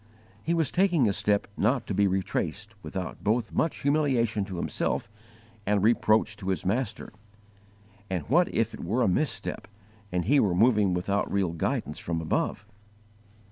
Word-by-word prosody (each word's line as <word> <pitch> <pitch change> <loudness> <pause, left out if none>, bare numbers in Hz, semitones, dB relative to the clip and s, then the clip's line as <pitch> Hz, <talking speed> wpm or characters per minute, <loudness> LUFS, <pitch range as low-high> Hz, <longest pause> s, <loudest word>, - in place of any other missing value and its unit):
He 170 +8 0
was 160 -5 +1
taking 175 - +3
a 100 - +1
step 100 +1 +1
not 115 +3 +1
to 105 - -3
be 100 +1 +3
retraced 95 +3 -2
without 95 -4 -6
both 110 +1 0
much 160 - 0
humiliation 130 -7 +2
to 95 - -7
himself - - -1 0.6
and 100 -1 +1
reproach 110 -1 +3
to 95 - -8
his 95 - -1
Master: 110 +3 -2 1.0
and 90 -4 -2
what 170 +8 +3
if 115 0 0
it - - -8
were 115 +9 +1
a - - +3
misstep 120 +12 -1 0.4
and 90 -1 -1
he 145 0 +4
were 95 -7 +2
moving 105 -3 +4
without 100 +3 -1
real 95 -4 +1
guidance 85 - -2
from 85 -1 -2
above! 80 +5 -1
105 Hz, 160 wpm, -27 LUFS, 95-125 Hz, 1.0 s, he